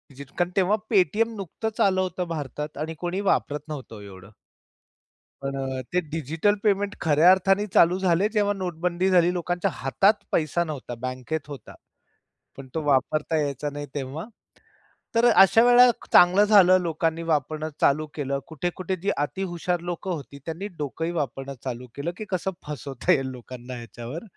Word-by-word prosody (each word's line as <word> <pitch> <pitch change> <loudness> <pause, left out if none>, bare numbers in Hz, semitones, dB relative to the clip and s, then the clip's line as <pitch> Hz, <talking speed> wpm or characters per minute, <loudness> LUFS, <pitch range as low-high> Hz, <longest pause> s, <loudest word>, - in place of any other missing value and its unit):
जितकं 140 +6 -3
तेव्हा 195 +2 +3 0.2
Paytm 215 +5 +2
नुकतंच 210 +3 -4
आलं 190 -1 +3
होतं 180 -1 -3
भारतात 150 -2 -5
आणि 160 +1 -3
कोणी 180 +3 -2
वापरत 145 - 0
नव्हतं 140 -6 -7
ओ - - -10
एवढं. 95 -1 -12 1.1
पण 135 0 -3
अ, 130 -1 -3
ते 180 - +3
डिजिटल 165 +6 +1
पेमेंट 205 -1 +1
खऱ्या 160 +2 +5
अर्थाने 195 +2 +2
चालू 175 +2 +5
झाले 190 +2 +2
जेव्हा 205 -2 +2
नोटबंदी 180 -1 -1
झाली. 175 -2 +4
लोकांच्या 175 0 -1
हातात 135 - +2 0.2
पैसा 165 +2 +1
नव्हता, 145 -6 -6
बँकेत 130 +4 -4
होता. 145 -2 -10 0.8
पण 135 - -9
तो 160 - -1
वापरता 145 +3 +1
यायचा 145 0 -2
नाही 145 0 -6
तेव्हा. 140 +3 -4 0.9
तर 230 +1 +4
अशा 195 +2 +6
वेळेला 245 +1 +7 0.2
चांगलं 180 +3 +7
झालं 190 -3 +6
लोकांनी 165 0 -1
वापरणं 155 +1 -1
चालू 150 +2 +3
केलं. 140 -2 -2
कुठे-कुठे 175 +4 -3
ती 200 - +1
अतीहुशार 175 +3 -2
लोकं 175 +2 -4
होती. 140 -4 -6
त्यांनी 170 +5 -4
डोकंही 160 +3 -3
वापरणं 140 -4 -4
चालू 125 -1 -5
केलं, 145 +5 -3
की 215 - -6
कसं 185 0 -1 0.2
फसवता 140 +2 -2
येईल 135 -6 +2
लोकांना 125 0 -9
ह्याच्यावर. 120 - -8
165 Hz, 155 wpm, -25 LUFS, 140-185 Hz, 1.1 s, वेळेला